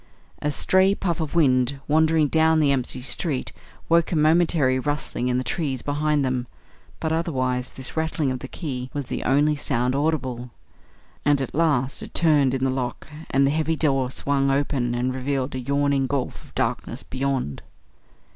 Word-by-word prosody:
A 150 - 0
stray 190 +6 +3
puff 170 -4 -2
of 155 +1 -4
wind 135 -4 +3
wandering 160 0 +3
down 160 +2 +3
the 145 -2 +3
empty 130 -1 -1
street 135 0 -2 0.4
woke 170 0 +3
a - - 0
momentary 155 -4 +3
rustling 145 -2 -2
in 125 0 +1
the 130 - -1
trees 135 -5 -2
behind 145 0 +1
them, 125 -1 -1 0.5
but 160 - -1
otherwise 130 -6 -1
this 130 -1 -7
rattling 160 -3 0
of 130 - -3
the 130 - -7
key 130 -5 -5
was 140 -3 -4
the - - -3
only 145 +3 +3
sound 125 -2 -1
audible; 130 -5 -1 0.7
and 145 -1 +3
at 135 - -4
last 140 -5 +1
it - - -10
turned 145 -5 +3
in 130 - -2
the 135 - +2
lock 125 -2 -4 0.2
and 135 +1 +3
the 135 - +2
heavy 160 +1 0
door 135 -5 +1
swung 135 +1 0
open 135 -3 0
and 125 +1 -1
revealed 130 +1 -2
a 130 - -3
yawning 140 +1 +1
gulf 135 -1 -3
of - - -20
darkness - - -2
beyond. 130 - -2
140 Hz, 175 wpm, -24 LUFS, 130-155 Hz, 0.7 s, stray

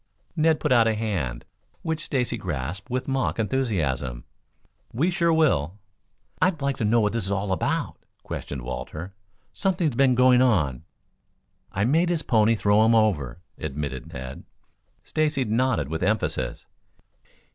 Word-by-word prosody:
Ned 160 -1 +3
put 150 - -1
out 115 -3 +5
a 110 - +1
hand, 90 - -3 0.4
which 160 -1 -2
Stacy 125 -4 0
grasped 90 - -4
with 130 +1 -2
mock 135 -1 0
enthusiasm. 80 - -1 0.7
"We 155 +11 +1
sure 170 -1 +2
will." 105 - +2 0.6
"I'd 185 -3 +2
like 140 -1 -1
to - - -2
know 115 +3 +4
what 105 0 +1
this 115 -4 -1
is 100 - -3
all 100 0 -1
about?" 95 - -1 0.2
questioned 65 -3 -6
Walter. 75 +9 -6 0.4
"Something's 180 -7 0
been 130 +1 +3
going 125 0 +5
on." 80 - +2 0.9
"I 100 - -1
made 165 +8 +3
his 170 -3 0
pony 115 -1 +3
throw 105 0 +3
him 115 +1 +4
over," 85 - +1 0.2
admitted 70 -4 -5
Ned. 65 +1 -7 0.6
Stacy 150 -4 0
nodded 110 - +1
with 80 +2 -4
emphasis. 105 +4 -1
110 Hz, 145 wpm, -25 LUFS, 80-135 Hz, 0.9 s, out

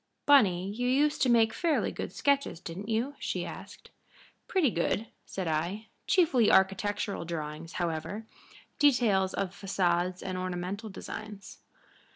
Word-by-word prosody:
"Bunny, 195 -11 +5
you 245 +4 -2
used 290 +4 +2
to 260 - +4
make 225 -2 +4
fairly 330 +5 +1
good - - -5
sketches, 280 - 0
didn't 185 +5 -7
you?" 235 +6 0
she - - -2
asked. - - -10 0.6
"Pretty 345 - +2
good," 175 +5 0 0.2
said 190 -3 -4
I. 170 +8 -2 0.2
"Chiefly 320 - +4
architectural 200 +1 +1
drawings, 160 -1 -5
however 175 +5 -3 0.5
details 230 -10 +3
of 195 -2 -2
façades 185 -2 0
and 185 -1 -3
ornamental 185 +4 -4
designs." 205 0 -8
200 Hz, 130 wpm, -29 LUFS, 180-240 Hz, 0.6 s, Bunny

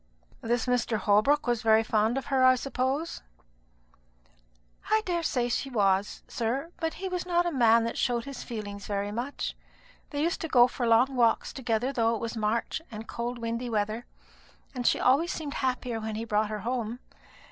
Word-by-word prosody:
'" - - -30
"This 235 0 0
Mr. 245 -2 +1
Holbrook 215 +9 +3
was 240 -2 0
very 220 -1 +4
fond 220 +2 +1
of 270 - -3
her, 260 -1 +4
I 255 0 +7
suppose?" 270 +5 -2 1.7
"I 435 0 +3
daresay 330 -9 0
he 245 +3 -1
was, 200 -4 +1
sir; 260 +8 -2
but 325 -1 -2
he 385 - -4
was 360 -1 -2
not 350 -1 +1
a 345 - 0
man 230 -5 +4
that 230 - -3
showed 240 -2 0
his 275 -2 -7
feelings 205 -3 -6
very 205 0 -2
much. 240 +6 -4 0.5
They 290 0 -2
used 335 +1 -1
to 325 - -2
go 245 -5 +6
for 245 -1 -3
long 245 +4 +4
walks 235 -2 +2
together, 245 0 -1
though 230 -2 +2
it - - -4
was 230 +1 -4
March 225 +6 -1
and 220 -1 -8
cold 240 +1 -4
windy 230 +1 -3
weather, 215 +2 -2 0.7
and 245 -2 -2
she - - +3
always 285 +7 +3
seemed 295 -3 -4
happier 250 -3 -1
when 220 -1 -4
he 225 +1 -3
brought 215 -1 +1
her 215 -1 -4
home. 235 -1 -2
240 Hz, 185 wpm, -28 LUFS, 225-270 Hz, 1.7 s, I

